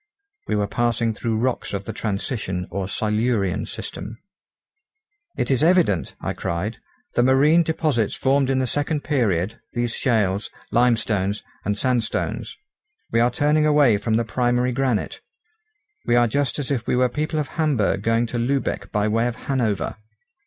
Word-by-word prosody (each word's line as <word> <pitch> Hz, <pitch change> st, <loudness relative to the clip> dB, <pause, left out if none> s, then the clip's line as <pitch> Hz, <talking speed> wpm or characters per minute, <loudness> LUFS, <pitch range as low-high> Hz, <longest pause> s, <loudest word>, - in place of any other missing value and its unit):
We -, -, 0 dB
were 105 Hz, -1 st, +1 dB
passing 115 Hz, +1 st, 0 dB
through 110 Hz, +1 st, -2 dB
rocks 125 Hz, -1 st, -1 dB
of 100 Hz, 0 st, -3 dB
the 110 Hz, -, -5 dB
transition 100 Hz, -3 st, -3 dB
or 100 Hz, -2 st, -2 dB
silurian 105 Hz, -2 st, 0 dB
system. 110 Hz, -, -7 dB, 1.2 s
"It -, -, 0 dB
is 130 Hz, -, +2 dB
evident," 165 Hz, -, +3 dB
I -, -, -3 dB
cried, 95 Hz, +7 st, -3 dB, 0.3 s
"the -, -, +3 dB
marine 140 Hz, +6 st, +5 dB
deposits 155 Hz, -9 st, 0 dB
formed 135 Hz, 0 st, +2 dB
in 135 Hz, -, +2 dB
the 130 Hz, -, +1 dB
second 145 Hz, +3 st, -1 dB
period, 110 Hz, -, 0 dB
these 120 Hz, -1 st, -1 dB
shales, 105 Hz, -6 st, +1 dB, 0.2 s
limestones, 110 Hz, -4 st, +1 dB, 0.2 s
and 105 Hz, 0 st, -1 dB
sandstones. 120 Hz, -2 st, -1 dB, 0.5 s
We 115 Hz, -, +2 dB
are 120 Hz, +1 st, +4 dB
turning 150 Hz, +4 st, +2 dB
away 145 Hz, -8 st, +5 dB
from 110 Hz, +2 st, 0 dB
the 115 Hz, +1 st, +1 dB
primary 125 Hz, +2 st, +1 dB
granite. 125 Hz, -3 st, -1 dB, 0.9 s
We 120 Hz, -, +4 dB
are 120 Hz, 0 st, +5 dB
just 140 Hz, +2 st, 0 dB
as 145 Hz, -2 st, -3 dB
if 120 Hz, -4 st, -1 dB
we -, -, +2 dB
were 125 Hz, 0 st, +4 dB
people 150 Hz, +5 st, -2 dB
of 145 Hz, -3 st, -2 dB
Hamburg 135 Hz, -, +1 dB
going 115 Hz, +2 st, +2 dB
to 120 Hz, +1 st, -4 dB
Lübeck 135 Hz, +3 st, -1 dB
by 105 Hz, 0 st, +1 dB
way 115 Hz, +2 st, +1 dB
of 120 Hz, -, -3 dB
Hanover!" 110 Hz, -, -1 dB
120 Hz, 160 wpm, -23 LUFS, 105-135 Hz, 1.2 s, marine